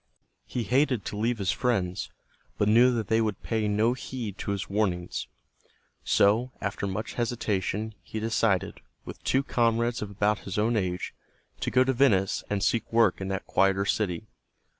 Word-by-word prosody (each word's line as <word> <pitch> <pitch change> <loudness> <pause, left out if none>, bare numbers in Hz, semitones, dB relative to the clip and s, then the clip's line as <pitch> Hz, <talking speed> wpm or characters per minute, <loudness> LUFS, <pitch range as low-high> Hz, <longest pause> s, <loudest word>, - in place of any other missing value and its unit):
He 120 - -2
hated 125 -1 +1
to - - -4
leave 115 +3 0
his 95 -4 0
friends, 95 -8 -1 0.5
but 105 - +2
knew 120 +4 +6
that 110 -3 -2
they 115 0 +3
would 110 -3 -2
pay 110 -2 0
no 110 +3 +2
heed 125 -5 -5
to - - -4
his 100 -1 -2
warnings. 90 - -1 0.8
So, 110 +6 +3
after 100 0 -3
much 100 +4 -4
hesitation, 110 -2 -1
he 110 - -6
decided, 110 -4 0 0.2
with - - -9
two 135 +1 +2
comrades 115 -1 +1
of 105 - -4
about 105 +1 +1
his 95 - -6
own 110 +3 +2
age, 90 -4 -2 0.5
to - - -1
go 130 - +4
to 130 +1 +1
Venice 110 -8 +2
and 100 -2 -1
seek 115 - 0
work 115 -5 +3
in 95 - -3
that 95 0 -3
quieter 95 0 +2
city. 100 -1 -1
105 Hz, 170 wpm, -27 LUFS, 100-115 Hz, 0.8 s, knew